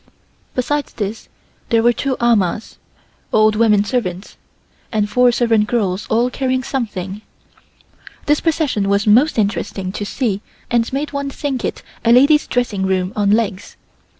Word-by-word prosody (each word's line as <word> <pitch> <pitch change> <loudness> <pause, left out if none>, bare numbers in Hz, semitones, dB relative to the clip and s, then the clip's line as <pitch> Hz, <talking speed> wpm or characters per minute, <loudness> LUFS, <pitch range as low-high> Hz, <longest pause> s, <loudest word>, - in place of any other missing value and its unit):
Besides 290 +3 -1
this 215 0 -5 0.4
there 230 -2 +3
were 240 0 +4
two 265 +1 -2
amahs 220 -3 +1 0.5
(old 215 0 +4
women 210 -2 +4
servants) 200 -5 -3 0.6
and 210 -2 0
four 250 +3 +4
servant 230 -3 +2
girls 205 -4 -1
all 240 +3 +2
carrying 260 -1 -1
something. 210 -7 -4 1.0
This 295 0 +2
procession 290 -11 0
was 200 +1 +2
most 240 +9 +4
interesting 200 -2 -1
to 205 - -5
see 205 -1 -2 0.3
and 235 -1 +1
made 285 +3 -3
one 280 0 -2
think 275 -2 -3
it - - -4 0.2
a 230 - +3
lady's 285 +5 +5
dressing 235 -6 -1
room 185 +1 -1
on 205 -1 +1
legs. 205 -2 0
230 Hz, 145 wpm, -18 LUFS, 205-255 Hz, 1.0 s, lady's